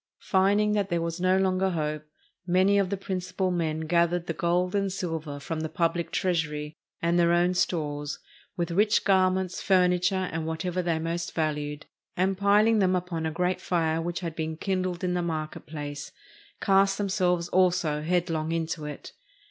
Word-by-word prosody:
Finding 205 +2 +3
that 205 -2 0
there 170 -1 0
was 165 +1 -3
no 185 +1 +3
longer 190 0 +2
hope, 155 -3 -3 0.4
many 190 +3 +4
of 195 -2 +1
the 200 - -2
principal 185 0 -2
men 160 -3 -1
gathered 170 +2 +1
the 165 - -2
gold 175 +3 0
and 200 -1 0
silver 160 -6 -4
from 160 +3 -4
the 160 0 -3
pubHc 170 +1 0
treasury, 155 -5 -1 0.3
and 170 +1 +2
their 170 0 +4
own 175 +1 +3
stores, 150 -5 -1 0.4
with 170 -1 -1
rich 210 +4 +3
garments, 185 -1 +2
furniture, 185 0 +2
and 160 0 -3
whatever 170 +3 -2
they 170 -2 0
most 170 +1 -3
valued, 150 -2 -2 0.3
and 190 +2 +2
piling 210 +2 +4
them 185 -2 +3
upon 175 -3 -2
a - - -2
great 180 +2 -1
fire 165 -3 0
which 170 +1 -3
had 165 -3 -4
been 160 -1 -3
kindled 185 -1 -2
in 180 -1 0
the 180 - 0
market 155 -3 -4
place, 145 -2 -6 0.5
cast 195 0 +3
themselves 180 -4 +1
also 175 -5 +2
headlong 165 -1 0
into 165 -2 -2
it. 150 -1 -7
175 Hz, 170 wpm, -27 LUFS, 160-185 Hz, 0.5 s, many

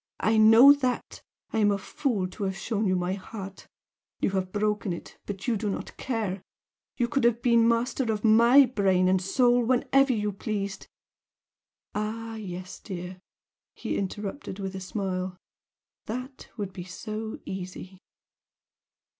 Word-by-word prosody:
I 220 0 +3
know 225 +6 +9
that! 255 -3 -2 0.3
I 225 - +1
am 205 -1 +4
a 200 - +2
fool 200 -1 -2
to 200 +2 -5
have 190 0 -2
shown 210 +1 -1
you 185 - +2
my 180 +1 -1
heart 195 0 -8 0.5
you - - +1
have 190 -1 -2
broken 210 -2 0
it, 170 - -10
but 200 +1 -6
you 240 - +2
do 210 0 -2
not 195 - -5
care 215 -7 -2 0.6
you 240 -3 +1
could 275 +1 0
have 235 0 +2
been 235 -2 +5
master 235 +1 +1
of 210 -1 -3
my 235 +5 +7
brain 195 -6 +2
and 185 0 +3
soul 245 +5 +3
whenever 260 +3 +3
you 210 -3 0
pleased 200 0 -4 0.6
" - - -64
"Ah 225 +2 -3
yes, 185 -4 -7
dear!" 180 -2 -7 0.6
he - - -3
interrupted, 200 +3 -4
with 195 -1 -4
a - - -4
smile 185 -1 -3 0.7
"That 255 +4 -6
would 200 -3 -4
be 180 - -6
so 215 +4 -6
easy!" 185 0 -7
210 Hz, 155 wpm, -27 LUFS, 190-230 Hz, 0.7 s, know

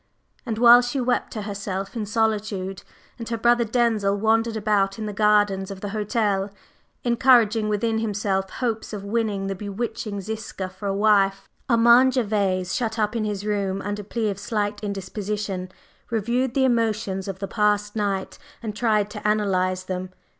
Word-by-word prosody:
And 225 -2 -2
while 240 +1 +8
she 245 +3 -2
wept 250 0 0
to 215 - -4
herself 200 0 -4
in 215 -3 -3
solitude, 210 -3 -1 0.4
and 230 - -6
her 230 - -1
brother 240 +1 +3
Denzil 220 -4 +1
wandered 225 +2 +1
about 205 -2 +1
in 220 - -4
the 210 - -4
gardens 205 -2 +2
of 195 -1 -8
the 205 - -4
hotel, 205 -1 0 0.5
encouraging 235 -3 +4
within 220 +2 0
himself 200 -3 -1
hopes 225 -2 -3
of 200 -2 -5
winning 205 -2 -1
the 195 - -2
bewitching 205 +1 -4
Ziska 210 -2 -5
for 190 +2 -7
a 195 - 0
wife, 200 -2 +3 0.2
Armand 235 +2 +6
Gervase, 200 -6 0
shut 230 -2 -1
up 210 +1 0
in 220 -2 0
his 205 -1 -3
room 200 -2 -1
under 205 0 -3
plea 215 +1 -2
of 195 - -7
slight 205 0 -2
indisposition, 200 -1 -4 0.4
reviewed 235 +3 0
the 265 -1 +3
emotions 215 -6 0
of 195 -2 -4
the 195 0 -4
past 210 0 +1
night 200 -3 -2 0.2
and 215 -2 -4
tried 215 -3 +2
to - - -4
analyze 185 -3 +1
them. 185 0 -4
210 Hz, 165 wpm, -24 LUFS, 195-225 Hz, 0.5 s, while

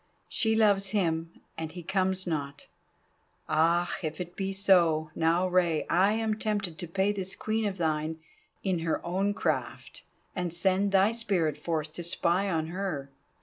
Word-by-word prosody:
She 220 -1 +1
loves 205 -3 +4
him, 165 -3 0 0.3
and 160 -1 -5
he 175 -1 -8
comes 190 +1 0
not. 145 -4 -4 0.8
Ah! 170 +3 +2
if 155 -1 -4
it 175 0 -6
be 195 0 -2
so! 170 -6 +3
Now, 170 +3 +2
Rei, 175 -4 +2
I 190 +5 +4
am 220 -1 -1
tempted 205 -7 -2
to 175 - -5
pay 190 +4 +1
this 190 -2 -3
Queen 220 0 -1
of 200 -2 -2
thine 160 -1 -1 0.5
in 185 -3 0
her 165 -1 -2
own 195 +4 0
craft, - - -3 0.3
and 180 -2 -2
send 190 +3 +1
thy 195 +2 +4
spirit 195 -10 0
forth 155 0 -3
to 175 - -6
spy 175 +3 +1
on 160 -3 -1
her. 170 -7 -4
180 Hz, 160 wpm, -29 LUFS, 160-195 Hz, 0.8 s, loves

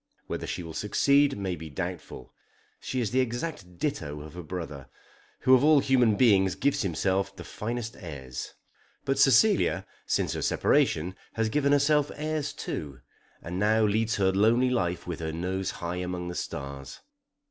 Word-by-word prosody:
Whether - - -4
she 90 - -4
will 80 -1 -8
succeed 140 - +3
may 95 -3 -2
be 80 0 -9
doubtful. 85 -4 -6 0.5
She 130 - -3
is 110 - -1
the 130 - +2
exact 120 - -3
ditto 75 - -3
of 75 0 -10
her 90 - -7
brother, 75 -6 -7 0.5
who 130 - +5
of 130 - +6
all 155 0 +6
human 125 -5 +3
beings 100 -6 +4
gives 140 +1 +1
himself 95 +2 0
the - - -9
finest 115 +1 -5
airs. 70 - -7 0.5
But 135 0 0
Cecilia 135 - +4 0.2
since - - 0
her - - -3
separation 85 +4 +2 0.2
has 115 -1 0
given 140 +3 +1
herself 145 +1 +3
airs 155 -1 -2
too, 70 -4 -6 0.4
and 90 +2 -4
now 110 +2 +3
leads 110 +2 +1
her 95 -1 +2
lonely 115 +6 +3
life 90 -8 -1
with 85 -2 -5
her 80 -1 -3
nose 90 +3 -2
high 85 +1 -4
among 90 -1 -4
the - - -5
stars. 70 -3 -6
100 Hz, 165 wpm, -28 LUFS, 85-125 Hz, 0.5 s, of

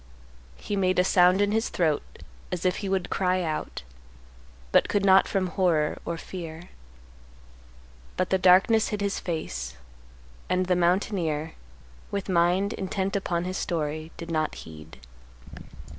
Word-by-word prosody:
He 205 - -4
made 185 -2 +1
a 180 - +5
sound 180 +1 +4
in 205 - +1
his 225 +1 0
throat 155 -4 +1 0.5
as 180 0 -3
if 185 0 +2
he 200 - -4
would 190 -2 -1
cry 185 -1 +1
out, 155 - -4 0.9
but - - +4
could 200 -1 +1
not 190 0 +6
from 195 -2 0
horror 170 -4 +1
or 170 - -3
fear. 165 -1 -8 1.5
But 185 - -1
the 190 - +3
darkness 190 +5 +5
hid 210 - -3
his 200 -1 -1
face, 65 - -4 0.7
and 185 0 +1
the 180 0 +2
mountaineer, 170 -3 0 0.6
with 200 0 -4
mind 180 +3 +2
intent 190 +1 -2
upon 175 -3 -1
his 185 +1 -3
story, 155 -1 -3
did 170 0 -7
not 155 -1 -1
heed. 80 0 -12
180 Hz, 145 wpm, -26 LUFS, 165-190 Hz, 1.5 s, not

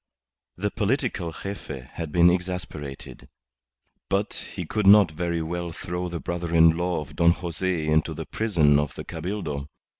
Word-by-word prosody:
The 105 +3 -1
political 115 -6 -1
Gefe 80 -8 -7
had 80 -3 -5
been 85 +2 +6
exasperated. 90 -6 -5 0.8
But 100 +2 0 0.2
he 90 - -4
could 105 +4 0
not 100 -4 +8
very 85 +1 -2
well 85 +1 -3
throw 90 +2 -4
the 85 -1 -4
brother 85 0 -3
in 80 0 +7
law 90 -1 -1
of 75 - -10
Don 85 0 +5
Jose 85 -1 -2
into 80 +1 +1
the 80 +1 -5
prison 80 -11 +3
of 75 -2 -2
the - - -6
Cabildo. 80 -5 -4
85 Hz, 155 wpm, -25 LUFS, 80-95 Hz, 0.8 s, not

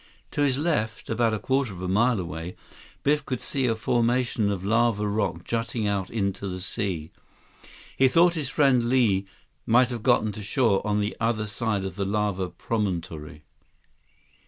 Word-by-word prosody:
To 145 - -2
his 135 -3 +3
left, 120 -9 -1
about 115 0 +2
a - - -1
quarter 130 +1 0
of 90 - -9
a - - -2
mile 115 +4 +2
away, 85 0 -5 0.5
Biff 150 +1 +2
could 130 -3 -3
see 135 -2 -1
a 115 - +1
formation 120 -1 +1
of 95 -1 -4
lava 115 -1 +2
rock 105 0 -1
jutting 115 -1 -2
out 100 -2 -1
into 100 -2 -2
the 90 -1 -4
sea. 90 -5 -3 0.8
He 135 - +5
thought 170 +6 +5
his 150 -6 -3
friend 130 -5 +3
Li 105 -7 +2 0.4
might 120 +2 +5
have 120 -2 -4
gotten 110 -3 +3
to 105 - -8
shore 105 -1 +2
on 105 0 +1
the 105 - -2
other 110 -1 0
side 105 -2 -2
of 95 -2 -6
the 100 - -1
lava 100 -2 -1
promontory. 85 -10 -4
110 Hz, 170 wpm, -26 LUFS, 100-120 Hz, 0.8 s, He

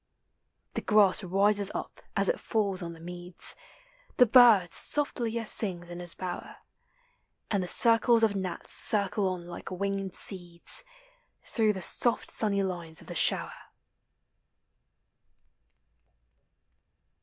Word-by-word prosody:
The - - -3
grass 210 -4 +3
rises 200 +2 +2
up - - -7 0.2
as - - +2
it - - 0
falls 200 -4 -2
on 170 -1 -6
the 165 - -15
meads, 175 +1 -1 0.6
The 250 - +6
bird 225 -6 +5
softlier 235 -6 -2
sings 175 -5 -2
in 175 - -8
his 175 -1 -7
bower, 180 -1 -7 1.0
And 200 -3 0
the 180 - -5
circles 230 +3 +3
of 215 -2 +2
gnats 190 -2 -6
circle 200 -1 -1
od 180 -1 -6
like 175 0 -10
Ringed 195 0 -4
sreds 175 - +1 0.6
Through 220 -3 0
thesofl 200 +5 +3
sunny 200 -2 +1
line* 175 -4 -6
of - - -12
the - - -8
shower. - - 0
195 Hz, 120 wpm, -28 LUFS, 175-220 Hz, 1.0 s, The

